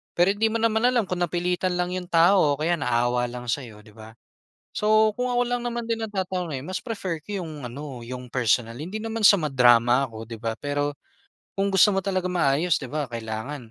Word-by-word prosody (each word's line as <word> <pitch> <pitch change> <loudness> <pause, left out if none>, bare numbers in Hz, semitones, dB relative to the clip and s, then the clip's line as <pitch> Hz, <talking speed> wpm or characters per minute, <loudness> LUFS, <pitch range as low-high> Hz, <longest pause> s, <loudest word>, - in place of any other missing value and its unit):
pero 175 +3 +4
hindi 220 +2 +2
mo 230 - 0
naman 220 0 +2
alam 235 -5 +1
kung 180 0 -3
napilitan 180 +1 -1
lang 180 0 -1
'yong 180 -1 -5
tao 165 -3 +5
o - - -16
kaya 165 +3 +1
naawa 120 -1 +1
lang 125 0 -8
sa'yo 115 -4 -4
'di 105 - -17
ba? 110 0 -12 0.6
So 215 0 +3
kung 250 - +1
ako 245 0 +2
lang 245 0 -1
naman 240 -1 -3
din 230 -1 -1
ang 215 -1 -6
tatanungin 180 -7 -3
mas 185 0 -3
prefer 195 -8 -4
ko 205 +1 -4
'yong 150 -6 -7
ano 135 0 -8
'yong 125 0 -8
personal. 115 -2 +1
Hindi 185 +8 -5
naman 225 0 -4
sa 200 - +8
ma-drama 125 -3 +4
ako 110 0 -9
'di 115 - -5
ba, 115 -1 -2
pero 145 0 -2 0.6
kung 195 - +2
gusto 195 +2 +5
mo 195 - +1
talagang 185 -2 -1
maayos 160 +1 +2
'di 135 - -6
ba 150 -1 -2
kailangan, 115 +3 -6
160 Hz, 210 wpm, -24 LUFS, 125-195 Hz, 0.6 s, sa